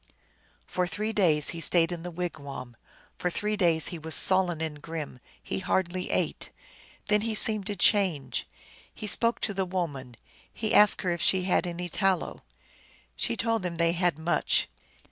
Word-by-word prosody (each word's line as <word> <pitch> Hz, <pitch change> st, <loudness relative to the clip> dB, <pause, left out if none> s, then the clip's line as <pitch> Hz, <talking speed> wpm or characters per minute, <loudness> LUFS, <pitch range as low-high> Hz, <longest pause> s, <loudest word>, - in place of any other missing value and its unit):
For 180 Hz, -1 st, -1 dB
three 215 Hz, +5 st, -3 dB
days 155 Hz, -8 st, +3 dB
he 170 Hz, -, -4 dB
stayed 165 Hz, +2 st, +3 dB
in 175 Hz, -1 st, -4 dB
the 175 Hz, -, -6 dB
wigwam; 145 Hz, -8 st, -6 dB, 0.4 s
for 180 Hz, -, 0 dB
three 210 Hz, +4 st, -1 dB
days 170 Hz, -5 st, +3 dB
he 175 Hz, -, -7 dB
was 160 Hz, -1 st, 0 dB
sullen 185 Hz, -3 st, +2 dB
and 155 Hz, -2 st, -4 dB
grim; 155 Hz, -5 st, -6 dB, 0.2 s
he -, -, -3 dB
hardly 185 Hz, -1 st, -1 dB
ate. -, -, -1 dB, 0.6 s
Then 210 Hz, 0 st, +2 dB
he 220 Hz, 0 st, -1 dB
seemed 215 Hz, -2 st, +3 dB
to 205 Hz, -, -3 dB
change. 185 Hz, -7 st, +1 dB, 0.4 s
He 215 Hz, -, -8 dB
spoke 230 Hz, +3 st, +1 dB
to 205 Hz, -, 0 dB
the 195 Hz, 0 st, -1 dB
woman; 155 Hz, -9 st, -4 dB, 0.4 s
he 220 Hz, -1 st, -2 dB
asked 210 Hz, -1 st, +6 dB
her 180 Hz, -, 0 dB
if 170 Hz, -1 st, -3 dB
she 185 Hz, 0 st, +3 dB
had 180 Hz, -1 st, +1 dB
any 175 Hz, +1 st, -4 dB
tallow. 190 Hz, 0 st, -1 dB, 0.7 s
She 115 Hz, -, -1 dB
told 230 Hz, -2 st, 0 dB
him 175 Hz, -2 st, -3 dB
they 170 Hz, 0 st, +2 dB
had 175 Hz, -3 st, +1 dB
much. 160 Hz, +2 st, +1 dB
175 Hz, 170 wpm, -27 LUFS, 160-195 Hz, 0.7 s, asked